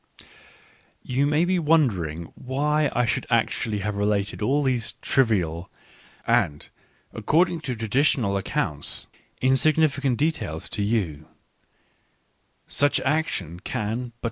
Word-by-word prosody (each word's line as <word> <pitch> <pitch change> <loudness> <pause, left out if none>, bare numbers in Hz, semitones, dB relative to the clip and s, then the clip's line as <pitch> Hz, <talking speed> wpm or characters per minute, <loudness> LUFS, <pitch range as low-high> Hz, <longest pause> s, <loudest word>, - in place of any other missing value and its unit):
10 - - -18 0.8
You 135 +3 +1
may 150 +3 +2
be 185 0 +1
wondering 100 - +1
why 150 +3 0
I 125 - +3
should 125 +2 -1
actually 110 -2 0
have 105 +1 -2
related 100 -1 0
all 140 +7 +2
these 125 -4 -1
trivial 90 -10 +1 0.6
and, 75 0 +1 0.5
according 170 +1 +1
to 130 -5 -3
tra 115 0 -4
ditional 125 -4 +2
accounts, 100 - -2 0.4
insignificant 140 0 +3
details 145 - -2
to 105 - -2
you; 95 -9 -1 1.4
such 145 +2 +2
action 95 - -1
can 115 +4 -3
but. 120 - -12
125 Hz, 115 wpm, -24 LUFS, 100-145 Hz, 1.4 s, I